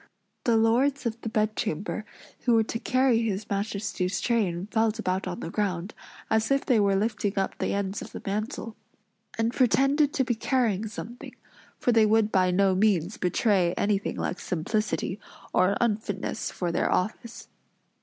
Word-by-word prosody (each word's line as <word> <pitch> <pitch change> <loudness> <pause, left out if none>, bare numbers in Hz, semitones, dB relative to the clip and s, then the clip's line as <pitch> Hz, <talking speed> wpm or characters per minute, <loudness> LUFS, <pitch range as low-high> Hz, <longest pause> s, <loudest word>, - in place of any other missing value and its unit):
The 235 -2 +4
lords 250 +5 +2
of 230 0 -3
the 225 - -3
bedchamber, 215 -2 -1 0.3
who 240 -2 +2
were 225 - +4
to 225 +1 -4
carry 255 -2 +2
his 210 -2 -2
Majesty's 200 -2 -2
train 195 -7 0
felt 220 -1 +1
about 190 -3 -1
on 180 -1 -5
the 165 - -5
ground, 190 -2 -2 0.3
as 220 0 +1
if 275 0 +2
they 245 -6 +3
were 200 -1 +3
lifting 210 0 -1
up 195 - 0
the - - 0
ends 200 0 -2
of - - -8
the - - -7
mantle; 215 +2 -3 0.6
and 225 +1 0
pretended 275 +4 +3
to 265 - +2
be 245 - 0
carrying 225 -3 0
something; 235 +3 -8 0.4
for 245 - +1
they 225 -2 +5
would 220 0 +3
by 185 -1 +3
no 190 +1 +3
means 190 -2 +1
betray 180 -1 +2
anything 200 -1 0
like 180 - -3
simplicity, 205 +3 -2 0.3
or 185 +2 +3
unfitness 210 -4 -1
for 175 -2 -3
their 170 - 0
office. 220 +4 -2
215 Hz, 165 wpm, -27 LUFS, 195-230 Hz, 0.6 s, they